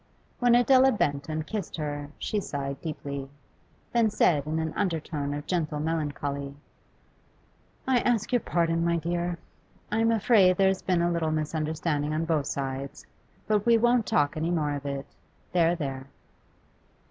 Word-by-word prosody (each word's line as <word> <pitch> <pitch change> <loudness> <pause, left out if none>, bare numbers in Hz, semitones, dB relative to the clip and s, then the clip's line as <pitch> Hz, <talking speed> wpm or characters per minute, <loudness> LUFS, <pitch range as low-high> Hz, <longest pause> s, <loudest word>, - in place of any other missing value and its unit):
When 245 -1 +5
Adela 260 +2 +5
bent 145 - -1
and 155 0 -2
kissed 210 -4 -4
her 145 -2 -4
she 210 - -2
sighed 140 -6 -4
deeply, 140 -4 -5 0.6
then 230 -2 +4
said 150 -7 +2
in 155 +1 -1
an 160 -1 -2
undertone 155 -6 -2
of 145 +1 -4
gentle 155 -4 -1
melancholy: 145 -3 -3 1.3
'I 260 -2 +4
ask 230 -2 0
your 245 - +5
pardon, 165 -4 0
my 170 0 +2
dear. 170 +1 -2 0.5
I 215 - +1
am 225 0 +3
afraid 200 -4 +4
there 195 -1 +4
has 190 - -1
been 180 -2 +1
a 175 - +2
little 165 -2 0
misunderstanding 155 -1 -1
on 160 +1 0
both 155 -4 0
sides. 135 0 -4 0.4
But 210 +1 +1
we 230 -1 +6
won't 240 0 +3
talk 145 +2 +2
any 160 +2 -1
more 155 -4 0
of 145 0 -5
it 140 -1 -3 0.5
there, 170 -1 +3
there! 135 -4 -5
160 Hz, 160 wpm, -27 LUFS, 145-190 Hz, 1.3 s, we